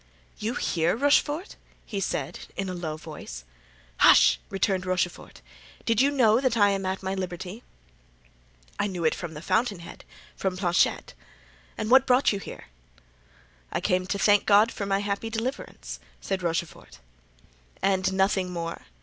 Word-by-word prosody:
"You 225 Hz, +5 st, -2 dB
here, 170 Hz, -, +1 dB
Rochefort?" 290 Hz, -, +1 dB, 0.3 s
he 200 Hz, -, -4 dB
said, 180 Hz, -2 st, -3 dB, 0.2 s
in 195 Hz, -1 st, -2 dB
a -, -, -3 dB
low 160 Hz, -3 st, -4 dB
voice. 150 Hz, -, -9 dB, 0.5 s
"Hush!" -, -, +6 dB
returned 195 Hz, -1 st, 0 dB
Rochefort. 180 Hz, -1 st, -3 dB, 0.4 s
"Did 230 Hz, +1 st, +3 dB
you 275 Hz, -, +4 dB
know 245 Hz, -4 st, +4 dB
that 255 Hz, -4 st, +1 dB
I 205 Hz, -2 st, +5 dB
am 195 Hz, -1 st, -2 dB
at 190 Hz, +1 st, -3 dB
liberty?" 190 Hz, +2 st, -4 dB, 1.2 s
"I -, -, +1 dB
knew 180 Hz, -4 st, -4 dB
it 155 Hz, -, +3 dB
from 170 Hz, -3 st, -6 dB
the 150 Hz, -, -8 dB
fountain 200 Hz, +3 st, +1 dB
head—from -, -, -7 dB
Planchet. 175 Hz, -2 st, +1 dB, 0.6 s
And 215 Hz, -, -3 dB
what 265 Hz, +1 st, +6 dB
brought 250 Hz, -2 st, +4 dB
you 200 Hz, -, -2 dB
here?" -, -, -9 dB, 1.1 s
"I -, -, -1 dB
came 185 Hz, 0 st, 0 dB
to 200 Hz, -, -1 dB
thank 205 Hz, +1 st, +3 dB
God 210 Hz, +2 st, +5 dB
for 200 Hz, -, -4 dB
my 195 Hz, 0 st, +1 dB
happy 205 Hz, +2 st, -2 dB
deliverance," 220 Hz, -, -5 dB, 0.2 s
said 190 Hz, -1 st, -3 dB
Rochefort. 170 Hz, -1 st, -4 dB, 0.8 s
"And 190 Hz, 0 st, +1 dB
nothing 190 Hz, -1 st, +1 dB
more? 170 Hz, -1 st, -5 dB
195 Hz, 150 wpm, -26 LUFS, 175-215 Hz, 1.2 s, Hush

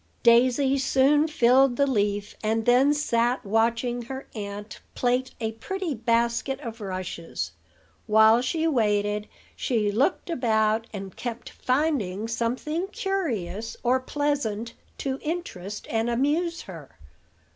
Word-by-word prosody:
Daisy 255 Hz, +3 st, +4 dB
soon 275 Hz, +3 st, +3 dB
filled 260 Hz, -2 st, +4 dB
the 280 Hz, -, +3 dB
leaf, 205 Hz, -5 st, -1 dB
and 220 Hz, +1 st, 0 dB
then 255 Hz, +4 st, +5 dB
sat 245 Hz, -5 st, +1 dB
watching 230 Hz, +3 st, +1 dB
her 265 Hz, +3 st, -7 dB
aunt 205 Hz, 0 st, -6 dB, 0.2 s
plait 250 Hz, +1 st, +1 dB
a 220 Hz, -2 st, -1 dB
pretty 345 Hz, -, -4 dB
basket 235 Hz, +3 st, 0 dB
of 230 Hz, -4 st, -7 dB
rushes. 180 Hz, -, -4 dB, 0.6 s
While 220 Hz, +2 st, +6 dB
she 320 Hz, +6 st, -1 dB
waited 210 Hz, -7 st, +1 dB, 0.3 s
she 220 Hz, -6 st, 0 dB
looked 265 Hz, -, +1 dB
about, 220 Hz, -4 st, +1 dB
and 195 Hz, -2 st, -7 dB
kept 240 Hz, -1 st, -6 dB
finding 250 Hz, -, 0 dB
something 255 Hz, +10 st, -2 dB
curious 230 Hz, -, -3 dB
or 255 Hz, +1 st, +3 dB
pleasant 255 Hz, -5 st, -2 dB, 0.2 s
to 270 Hz, -1 st, -3 dB
interest 210 Hz, -, -5 dB
and 225 Hz, +1 st, +1 dB
amuse 300 Hz, +8 st, 0 dB
her. 165 Hz, -8 st, -11 dB
235 Hz, 120 wpm, -26 LUFS, 215-275 Hz, 0.6 s, While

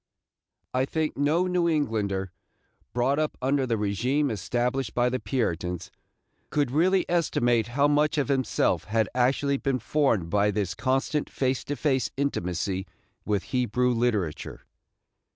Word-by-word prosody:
I 130 Hz, +1 st, +2 dB
think 155 Hz, +2 st, -2 dB
no 150 Hz, +6 st, +2 dB
New 180 Hz, -2 st, +1 dB
Englander, 105 Hz, -, -1 dB, 0.6 s
brought 130 Hz, +5 st, +1 dB
up 155 Hz, -1 st, -1 dB
under 135 Hz, +1 st, +1 dB
the 115 Hz, -, +1 dB
régime 120 Hz, +8 st, 0 dB
established 120 Hz, +4 st, -1 dB
by 120 Hz, 0 st, +3 dB
the 130 Hz, +1 st, -2 dB
Puritans, 90 Hz, -6 st, -2 dB, 0.6 s
could 145 Hz, -4 st, 0 dB
really 180 Hz, +6 st, +3 dB
estimate 120 Hz, -9 st, +1 dB
how 140 Hz, +1 st, +5 dB
much 150 Hz, +1 st, +2 dB
of 145 Hz, -, +1 dB
himself 135 Hz, -2 st, +1 dB
had 110 Hz, -1 st, +1 dB
actually 135 Hz, +3 st, +2 dB
been 135 Hz, -1 st, 0 dB
formed 115 Hz, -, 0 dB
by 105 Hz, 0 st, +3 dB
this 100 Hz, -4 st, -1 dB
constant 135 Hz, -, 0 dB
face 130 Hz, -1 st, -1 dB
to 145 Hz, -, -3 dB
face 135 Hz, -3 st, 0 dB
intimacy 95 Hz, -7 st, -2 dB, 0.4 s
with 105 Hz, -3 st, 0 dB
Hebrew 125 Hz, 0 st, +1 dB
literature. 110 Hz, -10 st, -1 dB
125 Hz, 135 wpm, -26 LUFS, 105-145 Hz, 0.6 s, how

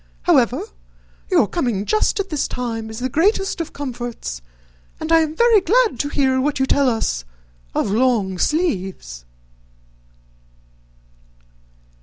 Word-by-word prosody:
However, -, -, +3 dB, 0.7 s
your -, -, +4 dB
coming 235 Hz, -, -1 dB
just 430 Hz, -, +1 dB
at 400 Hz, 0 st, -2 dB
this 300 Hz, -4 st, -1 dB
time 225 Hz, -3 st, -4 dB
is 220 Hz, -, -8 dB
the 250 Hz, +2 st, -2 dB
greatest 385 Hz, -, +1 dB
of 330 Hz, -, -5 dB
comforts, 240 Hz, -, -6 dB, 0.6 s
and 315 Hz, -, -4 dB
I 330 Hz, -, +7 dB
am 315 Hz, -1 st, -1 dB
very 470 Hz, -1 st, +5 dB
glad 445 Hz, -, +2 dB
to 285 Hz, -, -1 dB
hear 265 Hz, -3 st, +1 dB
what 290 Hz, +2 st, 0 dB
you 265 Hz, -, +3 dB
tell 275 Hz, 0 st, +3 dB
us 145 Hz, -, -1 dB, 0.5 s
of 195 Hz, -, 0 dB
long 215 Hz, -5 st, +1 dB
sleeves." 190 Hz, -, -2 dB
260 Hz, 130 wpm, -20 LUFS, 220-330 Hz, 0.7 s, I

